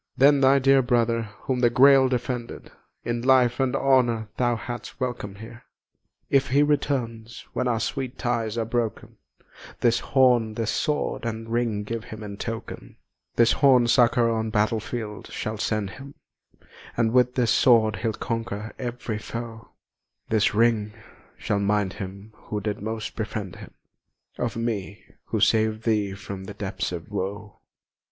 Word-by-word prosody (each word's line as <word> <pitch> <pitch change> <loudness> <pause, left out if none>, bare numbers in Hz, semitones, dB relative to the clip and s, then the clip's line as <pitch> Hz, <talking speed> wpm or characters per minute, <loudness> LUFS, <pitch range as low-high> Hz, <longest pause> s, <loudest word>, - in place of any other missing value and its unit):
Then 140 +1 +5
thy 135 +1 +6
dear 135 0 +5
brother, 115 -3 +1
whom 130 -2 -1
the 120 -1 +4
Grail 135 +2 +6
defended, 125 -1 -4 0.3
In 120 0 -1
life 125 -1 +4
and 130 -2 +1
honour 120 -5 +2
thou 120 -1 +2
hadst 120 +2 -7
welcom'd 120 -6 -4
here. 115 +3 -11 0.7
If 135 0 +2
he 140 +3 +3
returns, 120 -6 -2
when 125 - -1
our 115 -2 +1
sweet 130 +1 -3
ties 115 -2 -1
are 115 - 0
broken, 115 -1 -3 0.6
This 120 -1 +3
horn, 125 -5 +3
this 110 -1 -1
sword, 150 +6 -1
and 115 -1 -4
ring 115 -3 0
give 115 +2 -5
him 110 -1 -9
in 100 -1 -7
token; 115 +2 -6 0.4
This 115 0 +5
horn 130 -4 +5
succour 120 -1 +4
on 110 -1 -1
battlefield 110 0 -2
shall 110 0 -5
send 105 -3 -1
him, 140 +5 -11 0.8
And 115 -1 +2
with 125 0 +3
this 120 -4 +2
sword 115 -4 +4
he'll 115 -2 -1
conquer 115 -2 -4
ev'ry 120 -3 -4
foe; 115 0 -7 0.6
This 110 -1 +2
ring 110 -2 +2 0.4
shall 105 - -1
mind 100 -1 +1
him 100 +2 -8
who 105 - -3
did 105 0 -4
most 110 0 -4
befriend 105 -4 -4
him - - -12 0.6
Of 120 -2 -2
me 105 -4 -3 0.2
who - - -2
saved 110 0 +2
thee 105 -4 0
from 95 -1 -8
the 100 - -8
depths 100 -3 -3
of 85 +2 -7
woe!" 100 +1 -5
115 Hz, 150 wpm, -25 LUFS, 110-125 Hz, 0.8 s, thy